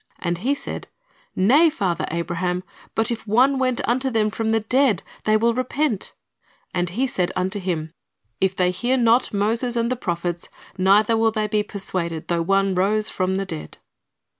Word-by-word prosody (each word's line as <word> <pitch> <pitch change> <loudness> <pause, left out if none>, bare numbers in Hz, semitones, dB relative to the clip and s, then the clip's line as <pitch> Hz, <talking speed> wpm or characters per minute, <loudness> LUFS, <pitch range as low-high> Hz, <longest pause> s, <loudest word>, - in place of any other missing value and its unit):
And 170 -1 -2
he 265 +8 +1
said. 280 - -6 0.5
Nay, 275 - +5
father 185 - -1
Abraham; 175 +2 -2 0.3
but 225 +2 +1
if 230 -1 -5
one 260 +6 +3
went 255 -2 0
unto 260 +3 +1
them 215 -3 +1
from 220 +3 -2
the 225 0 +2
dead, 250 -2 +2 0.2
they 215 0 +4
will 230 +2 +2
repent. 255 -2 -1 0.6
And 175 -1 0
he 235 +10 0
said 185 -9 -1
unto 190 +3 -1
him, 165 -4 -3 0.5
If 190 0 +1
they 180 -1 +2
hear 245 +8 0
not 235 0 +3
Moses 225 +4 0
and 235 +1 0
the - - +1
prophets, 175 -5 -3 0.3
neither 205 +4 +4
will 225 0 +3
they 215 -1 -1
be 210 0 +1
persuaded 180 -5 -4
though 170 -1 +1
one 195 +2 +2
rose 210 +4 +1
from 185 0 -1
the 195 0 -1
dead." 75 - -7
210 Hz, 175 wpm, -22 LUFS, 180-235 Hz, 0.6 s, Nay